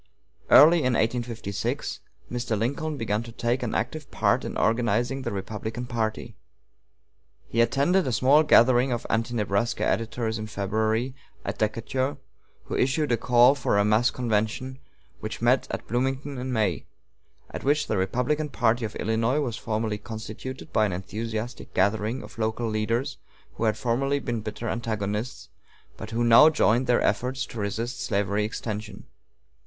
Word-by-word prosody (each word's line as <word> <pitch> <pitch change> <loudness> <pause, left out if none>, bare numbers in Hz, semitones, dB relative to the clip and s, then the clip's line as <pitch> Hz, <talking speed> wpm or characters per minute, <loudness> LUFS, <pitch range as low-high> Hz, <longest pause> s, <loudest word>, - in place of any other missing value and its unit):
Early 165 +4 +8
in 130 -4 +1
1856 115 -3 -2 0.3
Mr. 120 -2 -1
Lincoln 145 +7 -2
began 110 -3 -1
to 115 0 -9
take 120 +2 -1
an 120 - -2
active 140 +5 -3
part - - +1
in - - -4
organizing 120 +3 +1
the - - -3
Republican 110 +4 -5
party. 115 -1 -3 1.1
He 115 - +1
attended 140 +10 +2
a - - 0
small 135 +6 +5
gathering 130 -3 +5
of 120 - -2
Anti 115 +1 0
Nebraska 105 +1 0
editors 115 -1 -1
in 110 - -5
February, 110 +4 -1 0.3
at - - -4
Decatur, 130 +6 -1 0.5
who - - -5
issued 135 +2 +1
a - - +5
call 120 +3 +5
for 125 -7 0
a 100 - +3
mass 110 +4 +3
convention 125 +2 -2 0.4
which - - -5
met - - +2
at - - -5
Bloomington 135 +3 -2
in 130 +1 -4
May, 105 - 0 0.6
at - - -6
which 145 +2 +2
the - - -1
Republican 125 +11 0
party 120 -2 +1
of 110 - -6
Illinois 115 +5 0
was 125 -7 -2
formally 110 -1 -2
constituted 110 +4 -8
by 110 -1 +3
an 95 - -3
enthusiastic 110 +6 -5
gathering 105 +6 +1
of - - -12
local 110 +1 -1
leaders 110 +3 -1 0.3
who 115 - -2
had 110 0 +1
formerly 135 +5 0
been 120 -4 -3
bitter 110 +2 -5
antagonists, 110 +1 -3 0.5
but - - -8
who 115 +1 -1
now 120 +7 +8
joined 130 -5 +2
their 120 -1 +3
efforts 130 +2 0
to 115 - -8
resist 115 +4 -3
slavery 100 +1 0
extension. 105 -1 -5
115 Hz, 155 wpm, -26 LUFS, 110-130 Hz, 1.1 s, Early